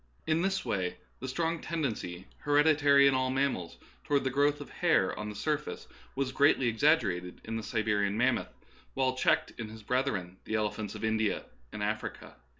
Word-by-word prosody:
In 160 +1 +2
this 195 -3 0
way 95 -6 -1 0.2
the 130 - -5
strong 165 +4 -1
tendency, 110 - -3
hereditary 145 -1 +5
in 140 - +5
all 130 0 +1
mammals, 130 -10 -1 0.3
to - - -20
ward 140 - +4
the 130 - 0
growth 145 +2 +2
of - - -9
hair - - +2
on 105 0 -5
the 105 - -7
surface, 150 +6 -3 0.3
was 135 -1 -1
greatly 135 -2 +4
exaggerated 110 - +1
in 115 - -5
the 115 - -2
Siberian 105 -2 0
mammoth, 125 +1 +1 0.5
while 130 -1 +2
checked 130 - +2
in 110 -2 -4
his 110 0 -11
brethren, 105 -8 -1
the 110 - -2
elephants 105 -1 -2
of - - -7
India 110 -1 +1 0.3
and 105 - -4
Africa. 110 +1 -4
130 Hz, 175 wpm, -30 LUFS, 105-145 Hz, 0.5 s, hereditary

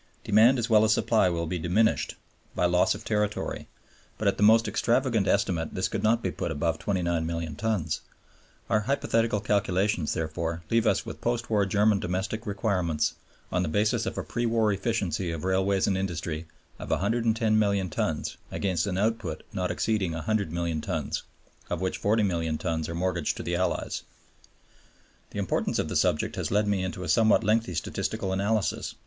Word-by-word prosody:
Demand 110 +5 +5
as 115 -2 -1
well 110 -2 +5
as 110 - +3
supply 110 -3 +3
will 85 -1 -1
be 85 +2 -3
diminished 95 +7 +1 0.4
by - - +2
loss 90 0 +3
of - - -10
territory, 105 0 -1 0.5
but 110 - -1
at 100 - +3
the - - -4
most 110 +2 +6
extravagant 120 -4 +1
estimate 90 -5 0
this 95 0 +1
could - - -3
not 115 +2 +2
be 95 - 0
put - - -3
above 80 +1 -1
29,000,000 85 -4 -1
tons. 90 -6 -1 0.7
Our 105 - +3
hypothetical 115 -2 +1
calculations, 100 -3 0
therefore, 80 +1 -3
leave 115 0 +3
us - - +2
with - - -8
post 120 -1 -1
war 100 -2 +3
German 105 +1 +3
domestic 95 +6 -3
requirements, 90 -7 0 0.4
on 90 - +1
the 90 - -1
basis 105 +6 +1
of - - -4
a - - -2
pre 120 0 -2
war 110 -2 +2
efficiency 100 -4 -1
of 80 -1 -4
railways 95 +1 +2
and 95 - +1
industry, 85 -4 -3 0.3
of - - -7
110,000,000 110 -3 +1
tons - - -2
against 95 -3 -1
an 95 -2 -1
output 105 -6 -1
not 90 -2 -1
exceeding 105 -6 0
100,000,000 85 -3 -1
tons, - - -2 0.5
of 90 - -2
which 95 0 -2
40,000,000 90 -7 +1
tons 80 -1 -2
are 85 - -4
mortgaged 85 -2 -1
to - - -5
the 85 - -1
Allies. 90 +1 -1 1.3
The - - -9
importance - - 0
of - - -1
the - - -4
subject - - +1
has - - -2
led 105 +1 +2
me 100 -2 +1
into 95 0 -4
a - - -5
somewhat 110 -2 +4
lengthy 110 -3 +1
statistical 95 +3 -2
analysis. 100 +2 -1
95 Hz, 170 wpm, -27 LUFS, 85-110 Hz, 1.3 s, most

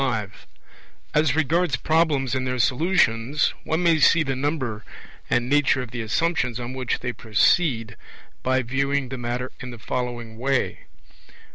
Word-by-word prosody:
25 110 -7 -3 0.7
As 150 0 +3
regards 165 +3 +2
Problems 155 -5 +1
and 130 -1 -1
their 125 0 -1
Solutions, 140 -1 +2
one 160 +3 0
may 165 -2 +4
see 165 +3 +5
the 135 -3 -2
number 130 -6 -2 0.5
and 120 0 +1
nature 145 -1 +3
of 115 - -10
the 120 - -4
assumptions 125 +1 0
on 120 +1 -5
which 130 -2 -2
they 125 0 -3
proceed 115 +1 +1 0.5
by 130 0 +1
viewing 140 +2 -1
the 130 -1 -5
matter 120 +1 -3
in 125 - -7
the 120 - -9
following 120 -1 -4
way. 135 +1 -1
130 Hz, 150 wpm, -24 LUFS, 120-150 Hz, 0.7 s, see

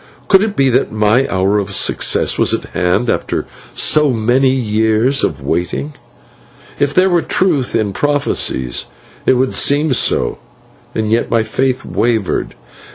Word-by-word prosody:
Could 195 -1 +5
it 210 -1 -2
be 135 - +2
that 120 - +1
my 110 +5 +2
hour 95 +2 +1
of 100 -1 -3
success - - +1
was - - +3
at - - -7
hand 90 +7 0
after - - -2 0.3
so 150 -1 +3
many 125 +3 +2
years 110 +1 +1
of - - -2
waiting? 90 - -3 0.9
If 145 -1 +1
there 185 +1 +4
were 175 -2 +2
truth 160 -10 0
in 105 -3 0
prophecies 140 - -1 0.4
it - - +5
would 130 +1 0
seem 145 0 +2
so, - - 0 0.6
and 110 -1 -1
yet 115 +1 +1
my 115 -1 +1
faith 130 +3 -2
wavered. 115 -5 -1
120 Hz, 150 wpm, -15 LUFS, 105-140 Hz, 0.9 s, Could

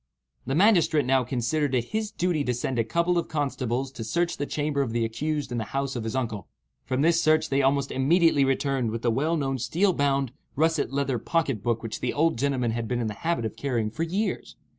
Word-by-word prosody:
The 135 - 0
magistrate 165 - +4
now 130 0 +3
considered 130 +3 -1
it 120 - +2
his 220 -1 -1
duty 175 -6 0
to 125 - 0
send 125 +1 -2
a - - +3
couple 170 +9 +1
of - - -4
constables 135 -3 -2
to 115 - -7
search 170 +10 -1
the 145 - -3
chamber 145 -1 -1
of 120 -5 -2
the 115 -1 +1
accused 145 +5 -3
in 120 - -1
the - - -1
house 135 0 -1
of 115 -2 -3
his 110 - -3
uncle. 115 -6 -3 0.4
From 130 +2 0
this 165 +1 +4
search 155 0 +3
they 135 0 +2
almost 140 0 +1
immediately 155 +2 +3
returned 135 -2 0
with 115 +1 -4
the 120 - +2
well 155 +8 +1
known 135 -3 -1
steel 185 - +1
bound, 140 -4 +1 0.2
russet 160 -1 +1
leather 135 -3 0
pocket 140 - -1
book 115 +1 -1
which 115 - -5
the 125 - -1
old 160 -5 +1
gentleman 130 -4 0
had 115 0 -3
been 125 0 -1
in 120 - -1
the - - -4
habit 165 +1 -1
of 110 - -4
carrying 120 -6 -1
for 155 - -6
years. 190 +6 -2
135 Hz, 225 wpm, -26 LUFS, 120-155 Hz, 0.4 s, magistrate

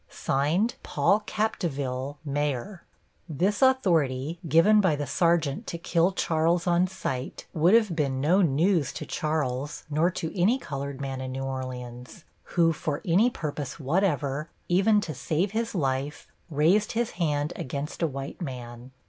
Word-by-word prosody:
PAUL 155 +8 +2
CAPDEVIELLE, 145 -11 -2
Mayor 145 - -2 0.5
This 185 +7 0
authority, 165 - +2
given 165 +8 +5
by 185 -6 +3
the 145 0 -3
sergeant 160 0 +1
to 170 - -4
kill 170 +2 +2
Charles 165 -1 +1
on 175 +1 +3
sight, 135 -8 -5
would 170 +6 +4
have 215 -7 +3
been 140 -4 0
no 170 +8 +3
news 160 -1 +2
to - - -6
Charles, 145 -3 -2
nor 155 +4 +3
to 165 -2 -5
any 200 +8 +3
colored 140 - -5
man 135 -1 -4
in 130 0 -4
New 135 +1 -4
Orleans, 125 +2 -6 0.3
who, 165 -1 +5
for 150 -1 -3
any 195 +7 +4
purpose 150 - -5
whatever, 150 -2 0 0.2
even 200 +4 +4
to 160 - -4
save 165 +8 -1
his 225 0 -2
life, 135 -2 -2 0.2
raised 170 +8 +2
his 235 +1 0
hand 145 -2 0
against 140 +5 -5
a 165 - +3
white 135 +4 -6
man. 125 -4 -7
155 Hz, 145 wpm, -27 LUFS, 135-180 Hz, 0.5 s, given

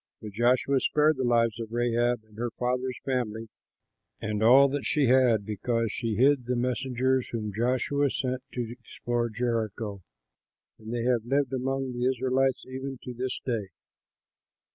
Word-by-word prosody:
But 105 - -8
Joshua 125 +5 +2
spared 150 +2 +2
the 130 - -1
lives 115 -2 +2
of 115 -1 -6
Rahab 120 0 +1
and 110 -1 -22
her 120 0 -1
father's 125 0 -1
family 115 -4 -2 0.7
and 105 0 -3
all 130 +5 +7
that 140 0 -2
she 150 -2 +2
had, 120 -4 +4
because 115 +2 -1
she 115 -2 -2
hid 130 +1 +3
the 125 - 0
messengers 130 +1 0
whom 105 -3 -4
Joshua 130 +5 +1
sent 130 0 -2
to 120 -2 -3
explore 120 0 -3
Jericho; 110 -3 -2 0.8
and 110 0 -8
they 120 -1 -2
have 120 -2 +2
lived 135 +2 0
among 135 0 -1
the 120 +1 0
Israelites 130 +1 0
even 130 +1 -5
to 125 - -6
this 125 +1 -3
day. 115 -6 -1
120 Hz, 155 wpm, -27 LUFS, 115-130 Hz, 0.8 s, all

